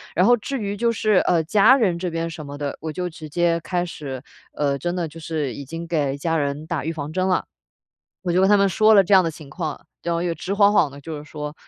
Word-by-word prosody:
然 180 - +4
后 240 +2 +5
至 270 +5 -4
于 205 -1 -3
就 235 +3 +2
是 215 -2 +1
呃， 165 -2 +3
家 210 +9 +5
人 185 -9 +1
这 180 -1 -2
边 165 0 -3
什 160 -2 -8
么 145 0 -8
的， 145 -1 -4
我 160 0 -4
就 180 +2 -3
直 160 -1 -10
接 170 +1 +1
开 175 +1 -1
始， 140 -6 -7 0.3
呃， 140 -2 0
真 175 +5 -2
的 175 -2 -1
就 165 +2 -11
是 155 -5 -3
已 140 - -8
经 165 +4 -6
给 145 -5 0
家 165 +3 0
人 145 +1 -2
打 160 -4 -2
预 165 - -1
防 150 -1 -5
针 185 +1 0
了。 185 - +1 0.8
我 180 - -1
就 175 - +2
跟 190 - +5
他 205 - +7
们 200 0 +3
说 215 +4 +4
了 200 -2 +7
这 200 - +1
样 190 - +8
的 165 - 0
情 150 -3 -12
况， 155 -3 -5 0.2
然 170 0 -1
后 170 - -1
又 175 - 0
直 185 +3 -4
晃 200 0 +5
晃 165 -7 +4
地 140 +1 -12
就 155 +1 -6
是 145 - -9
说 150 -1 -6
165 Hz, 295 characters per minute, -22 LUFS, 150-185 Hz, 0.8 s, 样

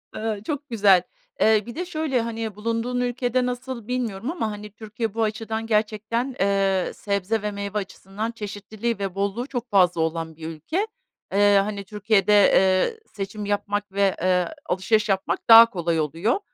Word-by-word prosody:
Eee, 215 -2 -3
çok 290 -1 -4
güzel. 200 -6 +5 0.4
E, 215 -1 +4
bir 235 - -8
de 360 - -3
şöyle, 310 -8 -1
hani, 225 -2 -4
bulunduğun 230 +3 -2
ülkede 245 0 0
nasıl 245 -2 -5
bilmiyorum 245 0 -2
ama, 225 -11 -2
hani, 210 0 -8
Türkiye 220 0 -5
bu 225 0 0
açıdan 220 +1 -3
gerçekten, 220 +4 -1
eee, 195 -1 +1
sebze 200 +2 -1
ve 210 0 -2
meyve 200 +1 -4
açısından 200 +3 -5
çeşitliliği 215 +1 -4
ve 195 -2 -3
bolluğu 200 +6 -2
çok 245 -3 -5
fazla 180 -5 +3
olan 160 0 -2
bir 160 0 -8
ülke. 305 - -3 0.5
Eee, 205 0 +5
hani, 200 -1 -4
Türkiye'de, 210 0 +1
eee, 195 - +4
seçim 205 0 -5
yapmak 205 0 -2
ve, 195 -1 +2
eee, 180 -1 +2 0.2
alışveriş 210 +3 +1
yapmak 190 +1 -1
daha 230 +1 +11
kolay 170 -5 -1
oluyor. 165 - 0
210 Hz, 160 wpm, -24 LUFS, 195-230 Hz, 0.5 s, daha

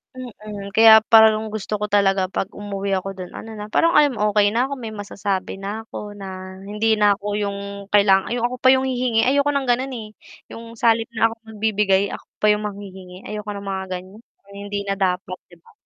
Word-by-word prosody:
Mm, 210 -5 -9
kaya 220 0 +9
parang 220 -1 +6
gusto 215 -1 -4
ko 210 - -2
talaga, 195 -2 +2
'pag 190 +1 -4
umuwi 200 -1 -5
ako 195 +1 -7
dun 185 -1 -8
ano 220 0 -9
na, 210 0 -8
parang, 335 +7 +3
um, 285 -6 +4
okey 205 0 +3
na 240 +4 +1
ako 280 - -5
may 230 -4 -7
masasabi 200 -2 -4
na 205 +3 -6
ako 210 -1 -7
na 190 -1 -8
hindi 215 +1 +1
na 205 -1 +4
ako 200 +1 -9
yung 200 -1 -2 0.3
kaila 200 -2 +4
ay 240 - -2
ako 250 +1 -2
pa 260 - +2
yung 260 - 0
hihingi. 250 -3 +1
Ayoko 280 +2 +2
ng 280 - +1
ganun, 260 +3 -1
eh, 215 -2 -8 0.4
yung 230 0 -10
sa 230 0 +4
halip 225 0 -1
na 225 +1 +3
akong 225 -1 -13
magbibigay, 205 -2 +1
ako - - -7 0.2
pa 210 - +6
yung 210 0 0
manghihingi 190 -2 -10
ayoko 210 0 -5
ng 200 0 -8
mga 190 0 -3
ganyan 185 +3 -7 0.3
hindi 200 0 -5
na 195 0 -3
dapat, 185 -1 -1
'di 175 - -17
ba? - - -21
210 Hz, 210 wpm, -21 LUFS, 195-225 Hz, 0.4 s, kaya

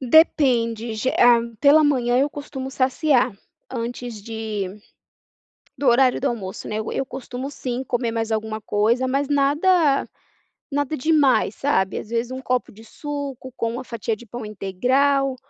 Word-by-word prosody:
Depende, 240 -5 +3
ge 240 +4 0
ah, 240 -1 +7 0.2
pela 300 +2 +6
manhã, 250 -4 +2
eu 280 +2 +3
costumo 270 -2 -7
saciar 260 -2 +2 0.4
antes 240 -2 -5
de 220 -2 -4 1.1
do 280 - -1
horário 250 +1 +4
do - - -3
almoço, 200 -6 -5
né, 215 - -3
eu 220 - -3
eu 270 - -1
costumo 260 0 -6
sim, 255 -2 -4
comer 240 -2 -1
mais 225 -1 -2
alguma 220 0 -2
coisa, 230 +6 +1
mas 275 +2 0
nada 290 +2 +3 0.6
nada 290 +2 -1
demais, 285 -6 +3
sabe. 190 -9 0
Às - - -8
vezes 235 +1 -1
um 260 0 -5
copo 255 -1 -1
de 220 +2 -15
suco 280 -1 -6
com 230 0 -1
uma 255 +1 -5
fatia 230 -2 -3
de 240 - -14
pão 240 +2 -7
integral 255 +7 +1
250 Hz, 155 wpm, -22 LUFS, 230-275 Hz, 1.1 s, ah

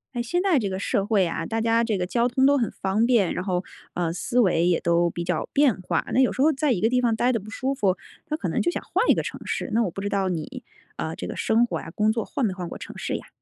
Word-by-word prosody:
诶， 240 - 0
现 350 +10 0
在 365 -7 +3
这 205 -4 -2
个 190 - -3
社 200 0 0
会 205 -4 +3
啊， 165 -1 -3
大 225 +4 -2
家 230 0 +2
这 215 -4 0
个 180 - -1
交 235 +5 +1
通 260 +2 +2
都 285 +1 +5
很 235 -5 0
方 195 +4 +2
便， 235 -7 +3
然 180 - -4
后， 180 -2 -1 0.3
呃， 170 -2 -1
思 240 +8 0
维 175 -5 +3
也 175 -2 +2
都 170 0 +2
比 170 +1 -4
较 175 -2 -2
变 275 -9 +3
化， 185 - -1
那 - - +3
有 260 - +3
时 260 - -2
候 310 +3 +5
在 295 -1 +1
一 185 - -2
个 220 - +3
地 250 +1 +2
方 235 -2 +2
呆 245 +3 +2
得 230 - 0
不 210 +2 -11
舒 260 +4 -2
服， 200 -8 +1 0.3
他 305 - -1
可 205 - -3
能 - - 0
就 - - +1
想 - - -4
换 - - 0
一 - - +8
个 - - -1
城 - - -6
市， - - -3
那 230 +1 +3
我 200 - -1
不 195 - -6
知 200 - -2
道 195 -1 0
你， 165 -4 -4 0.3
呃， - - -3
这 - - -6
个 - - -6
生 230 +2 +3
活 240 - -3
呀， 165 - -9
工 215 0 +3
作 225 -1 -2
换 270 - -1
没 205 - 0
换 180 -2 -5
过 - - -7
城 - - -9
市 - - -3
呀？ - - -7
220 Hz, 330 characters per minute, -24 LUFS, 185-245 Hz, 0.3 s, 一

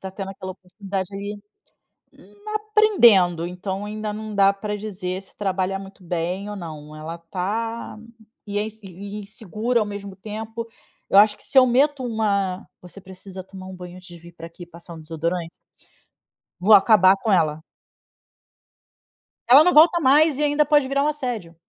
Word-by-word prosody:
tá 190 - -6
tendo 195 0 -6
aquela 185 -1 -7
oportunidade 190 +1 -6
aí, 200 +1 -5 1.2
aprendendo, 245 - +4
então 190 +3 -5
ainda 215 0 -5
não 215 0 -7
dá 195 0 +5
pra 210 +1 -4
dizer 190 -3 -5
se 195 - -16
trabalha 190 -1 -1
muito 195 0 -13
bem 180 +3 -3
ou 210 - -6
não. 155 -5 -9
Ela 160 +2 -7
tá 210 +8 -4 0.5
e 205 0 -3
é - - 0
ins 220 0 -10
insegura 205 +4 -4
ao 215 - 0
mesmo 200 -1 -7
tempo. 220 +3 -7 0.4
Eu 195 - +7
acho 210 0 +5
que - - -16
se - - -1
eu 260 - +9
meto 275 +2 +2
uma: 200 -5 -1
"Você 180 +2 -13
precisa 190 0 -10
tomar 190 0 -11
um 190 - -9
banho 180 0 -10
antes 185 0 -13
de 175 -1 -12
vir 170 +1 -15
pra 165 0 -10
aqui 170 +1 -12
e - - -10
passar 170 0 -12
um 160 - -11
desodorante." 165 +2 -3 1.1
Vou 200 +5 +5
acabar 195 -2 +6
com 215 +2 -2
ela. 160 -4 +1 1.8
Ela 270 +6 +8
não 360 - +3
volta 335 +3 +6
mais 300 0 +4
e - - +1
ainda 295 0 +2
pode 290 -2 +3
virar 275 +1 0
um - - +1
assédio. 245 - -4
200 Hz, 170 wpm, -22 LUFS, 180-220 Hz, 1.8 s, eu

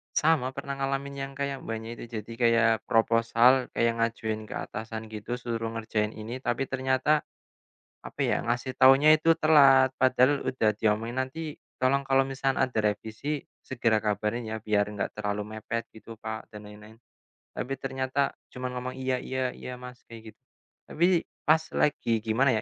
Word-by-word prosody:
Sama, 145 -5 +2
pernah 140 0 -5
ngalamin 135 +1 -2 0.2
yang 140 - -12
kayak 140 -1 -3
Mbaknya 115 0 -5
itu, - - -7
jadi 110 +1 -6
kayak 115 -1 +4 0.2
proposal, 115 +3 +4
kayak 115 0 +1
ngajuin 110 -1 -2
ke - - -7
atasan 110 0 -7
gitu, 110 +3 -4
suruh 115 -2 -3
ngerjain 110 -1 -2
ini, 115 +4 -6
tapi 120 0 -1
ternyata, 130 +3 +2 0.8
apa - - -10
ya, - - 0
ngasih 120 +2 -2
taunya 135 +4 +7
itu 165 +1 +3
telat, 135 -4 +6
padahal 130 +2 +3
udah 115 -4 +1
diomongin, 110 +2 0
"Nanti, 150 +3 -6 0.2
tolong 135 +2 +2
kalau 135 0 +2
misalkan 135 0 -1
ada 130 -2 0 0.2
revisi, 110 +8 -4 0.2
segera 115 -4 0
kabarin 105 +2 -2
ya, 110 - -3
biar 105 -1 0
enggak 105 -1 -4
terlalu 105 0 -3
mepet," 110 +2 -4
gitu 110 0 -12
Kak 110 0 -6
dan 105 0 -10
lain-lain. 110 +2 -13 0.6
Tapi 125 - -4
ternyata 135 +1 -1 0.2
cuma 125 0 -5
ngomong 125 +1 -5
"Iya 130 0 0
iya 130 -1 -2
iya 125 -1 -8
Mas," 125 0 -11
kayak 110 -2 -11
gitu. - - -53 0.5
Tapi, 175 +1 +2 0.2
pas 160 +1 +3
lagi 115 -7 +1
gimana 120 +4 +2
125 Hz, 160 wpm, -27 LUFS, 110-135 Hz, 0.8 s, taunya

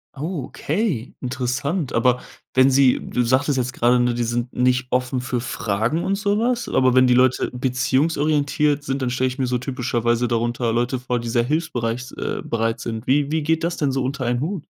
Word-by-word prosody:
Oh, 150 0 -4
okay, 155 - -2
interessant. 130 +4 -2
Aber 125 -1 +2 0.3
wenn 130 +1 +5
sie 135 -1 +4
du 125 - -2
sagtest 130 +4 +1
jetzt 125 -1 -1
gerade, 125 0 +3
ne, 120 0 +2
die 120 - -1
sind 120 +1 -2
nicht 125 0 +1
offen 125 0 0
für 125 -1 -2
Fragen 115 +5 -1
und 195 - 0
so 205 +1 0
was. 245 +1 0
Aber 130 -1 +3
wenn 130 0 +6
die 125 - +4
Leute 130 +1 +3
beziehungsorientiert 145 +3 +1
sind, 135 -1 -3
dann 130 - 0
stelle 130 +1 +1
ich 130 +1 -4
mir 130 - 0
so 125 0 0
typischerweise 120 -2 -1
darunter 120 0 0
Leute 120 +2 0
vor, 125 -1 -2
die 115 0 -5
sehr 120 0 +2
hilfsbereit 125 -5 -1
s 125 - -10
äh, - - -4
bereit 115 0 -1
sind. 110 0 -5
Wie 145 +2 +2
wie 160 -1 0
geht 160 +1 0
das 170 0 -1
denn 145 -3 0
so 135 0 -1
unter 130 0 -3
einen 120 0 0
Hut? 170 +1 -3
130 Hz, 205 wpm, -22 LUFS, 120-145 Hz, 0.3 s, wenn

